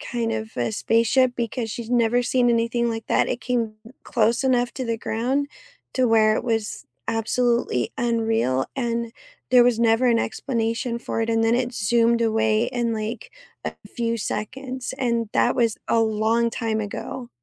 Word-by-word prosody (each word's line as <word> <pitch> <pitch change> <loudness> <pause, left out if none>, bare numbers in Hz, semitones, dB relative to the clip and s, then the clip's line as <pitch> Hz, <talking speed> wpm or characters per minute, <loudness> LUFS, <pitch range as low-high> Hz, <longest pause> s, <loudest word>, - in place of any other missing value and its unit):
kind 230 -2 -2
of 220 0 -5
a 120 -2 -1
spaceship 245 - +2
because 230 -1 -3
she's 235 +1 -6
never 240 0 +3
seen 245 0 +2
anything 235 0 +1
like 225 -1 -5
that. - - +2
It 245 - -2
came 235 -3 -1 0.3
close 230 +3 +1
enough 245 -2 +2
to 260 - -3
the 230 -1 -2
ground 260 +7 -1 0.5
to 255 -2 +2
where 215 -1 +4
it - - -2
was 225 -3 -2 0.2
absolutely 230 - 0
unreal 225 - +1
and 235 -2 -2 0.4
there 250 -1 +7
was 240 -2 +2
never 230 +2 +3
an 235 -1 +4
explanation 230 0 -2
for 225 - -3
it, 225 - -2
and 225 0 +2
then 225 +1 +3
it 245 -1 -2
zoomed 235 +2 +2
away 220 0 +2
in, 240 -2 -1
like, 220 - -5 0.3
a - - -2 0.2
few 230 -1 -2
seconds. 255 +5 -4
And 235 -4 0
that 245 - +2
was 230 -3 +2
a 230 - +3
long 225 +1 +1
time 225 -2 -2
ago. 235 +4 -6
230 Hz, 170 wpm, -23 LUFS, 225-245 Hz, 0.5 s, there